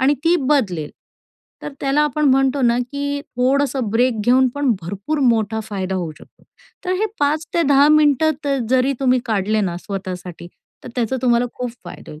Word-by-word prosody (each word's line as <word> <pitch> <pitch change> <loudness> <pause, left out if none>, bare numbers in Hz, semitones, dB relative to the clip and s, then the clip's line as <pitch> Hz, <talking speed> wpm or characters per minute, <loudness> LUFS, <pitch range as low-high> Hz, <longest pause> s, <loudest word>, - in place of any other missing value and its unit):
आणि 270 +3 +3
ती 335 - +4 0.2
बदलेल. 185 - 0 0.7
तर 295 - -6
त्याला 275 +2 +1
आपण 300 0 0
म्हणतो 270 +1 +2
ना 235 0 +3
की 285 +3 -3
थोडंसं 265 -2 0
ब्रेक 235 0 +1
घेऊन 255 +1 +4
पण 285 -2 +1
भरपूर 200 - -4
मोठा 220 -1 0
फायदा 195 -3 -4
होऊ 175 -4 -3
शकतो. - - -20 0.4
तर 365 - -1
हे 435 - +2
5-10 290 -1 +2
मिनिटं 305 0 +3
तर 280 -1 0
जरी 260 +1 +3
तुम्ही 255 -1 +3
काढले 215 -1 0
ना 180 -4 -2
स्वतःसाठी 180 -2 -7 0.4
तर - - -7
त्याचा 245 +1 0
तुम्हाला 240 -1 +2
खूप 250 -1 -4
फायदा - - -10
होईल. 150 - -11
255 Hz, 165 wpm, -19 LUFS, 210-285 Hz, 0.7 s, ती